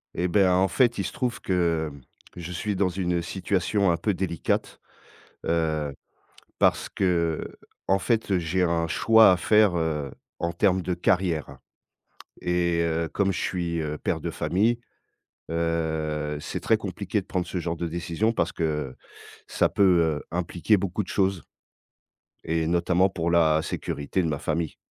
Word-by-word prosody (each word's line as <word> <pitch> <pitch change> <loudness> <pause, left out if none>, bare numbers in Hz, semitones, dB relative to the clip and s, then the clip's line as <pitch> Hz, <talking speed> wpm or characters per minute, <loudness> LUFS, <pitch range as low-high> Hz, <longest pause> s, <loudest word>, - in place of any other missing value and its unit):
Et 90 - 0
ben 95 +1 +3
en 95 +1 +3
fait, 120 +5 +2
il - - 0
se - - -3
trouve 125 -4 -3
que, 85 -4 0
hem, 70 -1 -13 0.3
que - - -12
je 85 +1 -6
suis 100 +3 -2
dans 95 0 +2
une 90 -1 -1
situation 95 +2 0
un 85 - +1
peu 105 +5 0
délicate, 90 -2 -2 0.7
heu, 80 -3 0 0.6
parce - - +2
que 85 -4 0 0.4
en 95 0 +3
fait, 105 -1 +1
j'ai 90 +2 0
un 85 -1 +1
choix 110 +5 +6
à 90 - +3
faire, 105 -1 +4
heu, 75 -4 -2 0.3
en 85 - -1
termes 95 +1 +2
de 90 0 -2
carrière. 85 -6 0 0.8
Et, 90 -1 +1
heu, 85 0 0
comme 95 +3 0
je 90 - -3
suis, 85 -2 -2
heu, 75 -1 -3
père - - -1
de - - -4
famille, 110 +6 +1 0.7
heu, 80 -2 -1
c'est - - -5
très - - +3
compliqué - - -3
de - - -16
prendre 90 -1 -2
ce 90 - -3
genre 85 -1 -3
de 85 +1 -3
décision 85 +6 -1
parce 85 -7 -1
que 75 -5 -2 0.5
ça - - +1
peut, 100 - +2 0.4
heu, - - -12
impliquer 90 +4 +1
beaucoup 100 +2 -2
de 90 - -12
choses. 95 -5 0 1.0
Et 80 0 0
notamment 85 +2 +2
pour 85 -3 -2
la 80 -2 +4
sécurité 80 +3 -2
de - - 0
ma 70 - -2
famille. 80 +1 -2
85 Hz, 165 wpm, -25 LUFS, 80-95 Hz, 1.0 s, choix